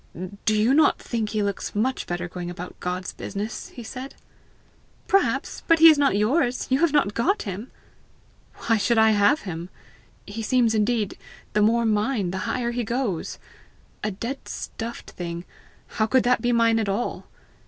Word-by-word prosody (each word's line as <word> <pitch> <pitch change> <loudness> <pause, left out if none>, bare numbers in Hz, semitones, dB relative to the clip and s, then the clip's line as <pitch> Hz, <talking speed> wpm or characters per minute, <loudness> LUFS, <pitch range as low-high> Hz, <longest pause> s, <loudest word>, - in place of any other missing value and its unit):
"Do 215 -1 +3
you 230 +5 +4
not 305 +1 +5
think 225 -3 -3
he 215 -1 -1
looks 200 0 -3
much 255 +5 0
better 175 0 -3
going 175 0 -6
about 175 +1 -8
God's 180 0 -3
business?" 210 +3 -5
he 240 - -10
said. 255 +4 -8 0.9
"Perhaps; 390 - +1
but 330 - +6
he 325 +1 +9
is 305 - +2
not 275 -8 +3
yours; 245 +4 +1
you 260 - +3
have 340 -1 +3
not 280 -9 +2
got 390 - +1
him!" 205 +4 -6 1.0
"Why 225 -1 +3
should 230 +3 +1
I 220 0 +6
have 215 +9 +3
him? 175 -2 -6 0.6
He 210 +2 -6
seems, 235 0 +2
indeed, 215 -1 0 0.3
the 210 - +3
more 230 +2 +3
mine 210 -3 +1
the 190 0 -3
higher 240 -1 -1
he 240 0 -2
goes. 230 -7 -2 0.7
A 215 - 0
dead 235 +7 -5
stuffed 230 +1 -6
thing 170 0 -6 0.4
how 215 - -1
could 260 +3 +3
that 250 +1 +2
be 245 - +1
mine 230 -1 +3
at 215 -2 -1
all? 205 +5 -2
225 Hz, 175 wpm, -24 LUFS, 200-250 Hz, 1.0 s, he